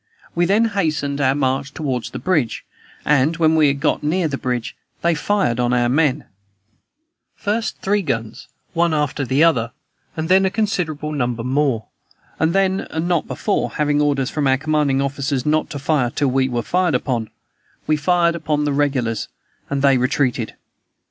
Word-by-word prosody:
We 175 0 +1
then 210 +5 +3
hastened 155 -9 -1
our 135 0 +3
march 135 0 -1
toward 130 -6 -2
the - - -6
bridge, 155 -11 -1 0.4
and, 150 +2 +3
when 160 -1 +3
we 155 -2 +5
had 140 0 0
got 150 - +1
near 165 +3 +1
the 145 - -3
bridge, 125 -2 -3 0.3
they 170 0 +3
fired 150 - 0
on 120 0 +1
our 120 -1 +2
men 145 0 +1 1.1
first 215 +2 -2
three 205 +1 +2
guns, 115 - -4 0.3
one 170 -2 +2
after 150 -1 -1
the 135 +5 +2
other, 120 -8 +2 0.4
and 160 0 -2
then 190 +2 +5
a 190 - +3
considerable 180 -8 -2
number 120 -5 -2
more; 130 -3 0 0.5
and 160 +1 +2
then, 190 0 +1
and 160 +2 -2
not 175 -3 0
before 205 - -1
(having 150 -1 +1
orders 140 -3 +1
from 145 -3 0
our 130 0 +3
commanding 145 -2 +1
officers 140 -1 -2
not 155 +1 +1
to 150 - -5
fire 140 -3 +1
till 140 +3 0
we 130 0 +1
were 120 -2 -2
fired 180 -1 +1
upon), 120 -3 -1 0.6
we 155 - +2
fired 170 +3 +2
upon 155 -3 -1
the 145 - 0
regulars, 135 -6 0 0.4
and 140 0 -1
they 135 -2 +5
retreated. 125 -4 0
145 Hz, 175 wpm, -20 LUFS, 130-165 Hz, 1.1 s, we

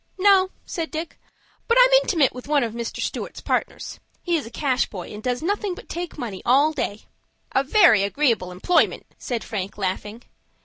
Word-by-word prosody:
"No," 380 -1 +5 0.2
said 330 -3 -4
Dick; 320 +1 -6 0.5
"but 465 - +3
I'm - - +7
intimate 315 - +2
with 250 +1 -9
one 290 -2 +2
of 225 -2 -3
Stewart's - - -5
partners. - - -3 0.2
He 345 -2 +1
is 300 -7 -2
a - - -8
cash 265 0 0
boy, 185 -1 -8
and 210 - -8
does 250 +4 -2
nothing 405 +1 -1
but - - -12
take 345 0 -5
money 215 -9 -5
all 275 +5 +4
day." 215 -7 -3 0.5
"A 270 - +2
very 305 - +5
agreeable 210 -3 +1
employment," 185 - +1
said 240 -3 -3
Frank, 200 -3 -5
laughing. 205 +4 -4
270 Hz, 175 wpm, -23 LUFS, 215-345 Hz, 0.5 s, I'm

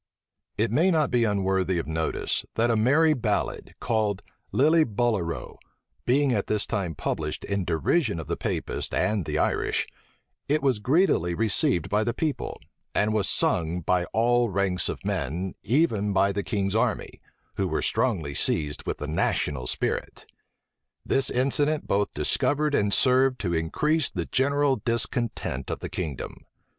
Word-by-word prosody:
It 110 0 +1
may 165 +10 +3
not 160 -4 +2
be 120 -2 +3
unworthy 95 -3 0
of 85 - -2
notice 80 0 -2
that 115 +1 +2
a - - +2
merry 145 +8 +4
ballad, 125 - -2
called 110 -4 -1 0.3
Lillibullero, 120 - +1 0.5
being 135 +2 +3
at 100 -4 -1
this 105 -1 +1
time 95 -7 -2
published - - -3
in 100 -2 -2
derision 95 - +1
of 80 - -6
the - - -2
Papists - - -3
and 105 -5 0
the - - -2
Irish, - - 0 0.6
it 150 +1 +1
was 130 -6 +2
greedily 125 - +2
received 90 -5 +1
by 105 +1 +1
the 120 +2 -2
people, 155 -1 -3 0.4
and 105 +1 +2
was 105 -2 +1
sung 85 +1 +1
by 90 +2 +1
all 120 +3 +2
ranks 95 -2 0
of - - -6
men, 85 +8 -2
even 110 - +1
by 100 +1 +3
the 100 +1 -2
king's 100 -2 -2
army, 110 - -1 0.4
who - - 0
were - - -1
strongly 85 - 0
seized 75 0 -1
with - - -2
the 75 - -5
national 75 -3 -1
spirit. - - -3 0.8
This 135 -1 +2
incident 145 +4 +1
both 100 +1 +1
discovered 150 +1 +1
and 100 -6 +2
served 130 +3 +3
to 85 -4 -1
increase 145 - +1
the 85 -4 -4
general 140 - +2
discontent 115 - -2
of - - -2
the - - -6
kingdom. 75 -7 -6
105 Hz, 150 wpm, -26 LUFS, 90-130 Hz, 0.8 s, merry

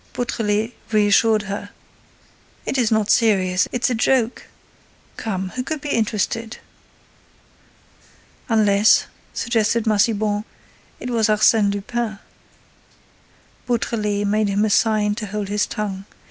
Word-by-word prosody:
Beautrelet 225 -2 -1 0.2
reassured 215 +1 +3
her: 200 +1 -5 1.0
"It 270 - -1
is 235 -3 +2
not 220 -2 +2
serious—it's 200 +1 +2
a 250 - 0
joke. 240 +1 0 0.7
Come, 190 -4 -3
who 250 - -4
could 310 +4 -4
be 295 +1 -6
interested?" 225 0 -1 1.9
"Unless," 210 -2 +4 0.3
suggested 230 -1 0
Massiban, 210 -1 +1 0.6
"it 250 - -5
was 225 -2 +2
Arsène 215 -1 +4
Lupin." 215 +2 -3 1.5
Beautrelet 210 -4 -1
made 210 +1 +1
him 200 +2 +1
a 215 - 0
sign 210 -1 +2
to 215 0 -5
hold 205 0 -4
his 210 0 0
tongue. 195 -2 -4
215 Hz, 110 wpm, -21 LUFS, 205-230 Hz, 1.9 s, Unless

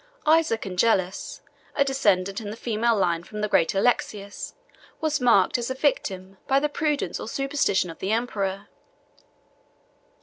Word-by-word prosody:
Isaac 310 -8 +3
Angelus, 190 0 0 0.3
a 280 - +3
descendant 205 -7 +1
in 205 - -6
the 215 - -7
female 230 0 +1
line 170 -4 +1
from 210 +4 -7
the 210 - +1
great 165 -3 +2
Alexius, 200 -2 -1 0.4
was 310 -3 0
marked 235 -2 +4
as 235 - -3
a 260 - -2
victim 195 -9 -1
by 270 +1 +4
the 300 +1 0
prudence 295 -1 -1
or - - -6
superstition 275 -9 0
of 165 - -13
the 190 - -2
emperor. 200 -4 -2
220 Hz, 145 wpm, -25 LUFS, 195-270 Hz, 0.4 s, marked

